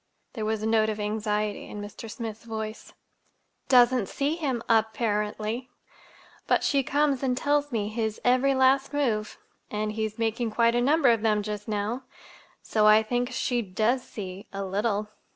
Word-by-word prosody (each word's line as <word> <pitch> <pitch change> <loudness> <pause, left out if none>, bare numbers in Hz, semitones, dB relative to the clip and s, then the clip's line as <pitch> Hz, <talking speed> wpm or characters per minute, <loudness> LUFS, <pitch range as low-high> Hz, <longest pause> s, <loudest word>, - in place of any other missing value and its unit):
There 220 -4 -3
was 215 0 -1
a - - -1
note 220 -1 +3
of 215 0 -3
anxiety 210 0 -2
in 210 - -7
Mr. 205 +2 -8
Smith's 225 -1 -6
voice. 220 -1 -6 0.8
"Doesn't 245 -4 +5
see 285 +3 -1
him, 270 -8 -2
apparently. 220 +1 0 0.8
But - - +3
she 280 - +2
comes 285 0 +1
and 255 -2 0
tells 290 +1 +1
me 215 -4 -1
his 220 0 -2
every 255 +2 +4
last 265 +2 +3
move 225 -8 -1 0.3
(and 215 0 -2
he's 220 0 -3
making 230 +1 -1
quite 230 +1 +3
a 240 - +2
number 285 +1 +4
of 225 -2 +1
them 210 -2 +2
just 210 -1 -5
now!), 215 +4 -2 0.6
so 215 -1 +2
I 215 +1 +7
think 245 +2 -1
she 245 -1 0
does 220 +5 0
see—a 195 -2 -7
little." 205 +2 -1
220 Hz, 160 wpm, -27 LUFS, 210-250 Hz, 0.8 s, I